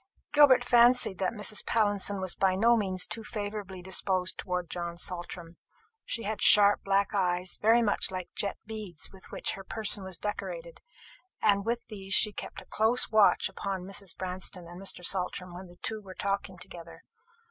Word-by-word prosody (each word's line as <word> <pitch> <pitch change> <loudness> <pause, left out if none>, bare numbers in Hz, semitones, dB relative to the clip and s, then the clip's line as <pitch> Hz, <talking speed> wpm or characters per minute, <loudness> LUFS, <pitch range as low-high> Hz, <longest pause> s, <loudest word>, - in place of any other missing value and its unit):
Gilbert 290 -3 +6
fancied 240 -4 +4
that 190 - 0
Mrs. 210 -1 -1
Pallinson 205 -2 0
was 185 -2 -3
by 190 -1 +1
no 230 +5 +4
means 190 -4 0
too 225 - -6
favourably 205 -4 -6
disposed 185 0 -1
towards 180 -2 -4
John 170 -1 -4
Saltram. 175 -1 -6 0.5
She 230 - -3
had 210 0 -3
sharp 205 -1 +7
black 195 +1 +1
eyes, 180 -2 0
very 230 +2 +4
much 205 - 0
like 185 -2 -5
the - - -63
jet 200 - -2
beads 210 -7 -6
with 190 - -15
which - - -2
her 195 - -7
person 210 0 0
was 190 -2 -6
decorated, - - -6 0.6
and 200 0 +2
with 235 +1 -1
these 195 -2 -2
she 210 - +4
kept - - -7
a - - -24
close 225 +4 +2
watch 215 -2 +4
upon 195 -1 -5
Mrs. 195 -1 -4
Branston 185 -1 -3
and 175 +2 -10
Mr. 185 -2 -2
Saltram 180 -1 -1
when 180 +1 -9
the 175 0 -17
two 220 -1 -3
were 190 -2 -11
talking 195 -1 -3
together. 170 -1 -10
195 Hz, 180 wpm, -29 LUFS, 185-215 Hz, 0.6 s, sharp